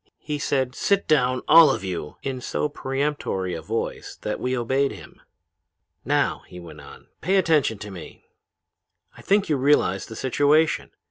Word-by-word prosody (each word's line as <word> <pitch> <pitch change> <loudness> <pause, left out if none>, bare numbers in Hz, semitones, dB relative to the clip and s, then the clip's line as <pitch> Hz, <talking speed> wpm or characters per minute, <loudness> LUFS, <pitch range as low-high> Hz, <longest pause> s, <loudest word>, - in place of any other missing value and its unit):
He 150 -1 -5
said, 130 -3 -1
'Sit 200 +7 0
down! 130 -4 +2
All 165 -1 +8
of 135 - -1
you!' 90 -5 -5
in 130 -2 -4
so 150 - -2
peremptory 135 -10 -3
a 80 - -5
voice 110 +8 -4
that 105 - -3
we 125 0 -1
obeyed 130 +4 0
him. - - -13 0.8
"'Now,' - - 0
he 90 - -11
went 80 -4 -11
on, - - -14 0.2
'pay 190 +4 +1
attention 155 - +2
to 105 0 -9
me. 90 -4 -11 0.9
I - - -13
think 200 0 +2
you 150 - +1
realize 130 -9 +2
the 110 - -9
situation. 145 +6 +2
130 Hz, 160 wpm, -24 LUFS, 105-150 Hz, 0.9 s, All